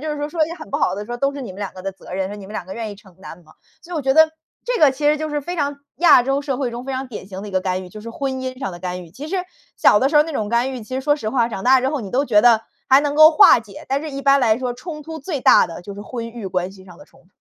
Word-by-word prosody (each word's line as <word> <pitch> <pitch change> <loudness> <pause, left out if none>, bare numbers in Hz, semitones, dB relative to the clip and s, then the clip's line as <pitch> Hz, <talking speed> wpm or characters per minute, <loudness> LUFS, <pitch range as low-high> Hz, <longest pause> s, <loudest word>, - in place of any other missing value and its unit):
就 310 - -3
是 290 - -7
说， 295 - -2
说 315 0 +1
一 - - -9
些 335 - -6
很 - - -10
不 - - -1
好 180 - +1
的 205 - -5
时 240 - -13
候， - - -3
都 275 +2 +1
是 280 - -6
你 210 - -7
们 195 - -13
2 200 - -4
个 185 - -9
的 195 0 -4
责 185 - -13
任， 190 0 -2
说： 205 - -7
“你 195 -2 -10
们 210 - -11
2 180 - -5
个 190 - -7
愿 225 -2 -5
意 200 - -9
承 190 -3 -19
担 170 - -10
吗？” 155 - -20 0.3
所 355 - -12
以 - - -2
我 295 - -2
觉 265 0 +2
得 315 0 +6 0.3
这 485 -2 -1
个 295 -3 +7
其 290 +3 -6
实 300 +1 +4
就 310 0 -3
是 295 0 -1
非 350 +5 -5
常 285 -1 -2 0.2
亚 325 -7 +7
洲 275 +2 0
社 275 -3 -2
会 265 -3 -1
中 240 +2 -6
非 270 - -4
常 260 +1 -3
典 210 -5 -8
型 190 -1 -7
的 - - -7
一 - - -8
个 185 - +1
干 185 0 -2
预， - - -11
就 215 +4 -11
是 230 +2 -8
婚 270 +2 -3
姻 260 -1 -5
上 195 -7 -3
的 175 - -10
干 180 -1 -5
预。 165 - -16
其 285 - -9
实 385 - -2 0.4
小 205 - +5
的 265 - +3
时 295 - +1
候 295 - +7
那 325 - -6
种 215 -7 -2
干 240 +3 +1
预， 250 - -6
其 235 +4 -8
实 260 - -1
说 290 +2 +2
实 215 -6 -4
话， 240 -3 +1
长 195 -4 -6
大 260 0 +5
之 260 - 0
后， 290 0 -2
你 200 -4 -7
都 275 +3 +1
觉 210 -5 +4
得 230 -2 +5 0.3
还 265 +1 +7
能 290 0 -1
够 310 +1 +8
化 305 -6 +7
解。 205 -3 -12
但 275 +1 0
是 310 - -5
一 275 - -5
般 275 0 +4
来 225 -2 +3
说， 250 -1 -2
冲 300 +3 -8
突 320 0 -7
最 285 -1 -4
大 - - +6
的 165 - -9
就 200 +2 -8
是 205 - -8
婚 230 0 -6
育 225 -4 -7
关 185 +1 -2
系 190 -1 -15
上 180 -1 -15
的 195 - -14
冲 - - -24
突。 - - -30
250 Hz, 390 characters per minute, -20 LUFS, 200-285 Hz, 0.4 s, 够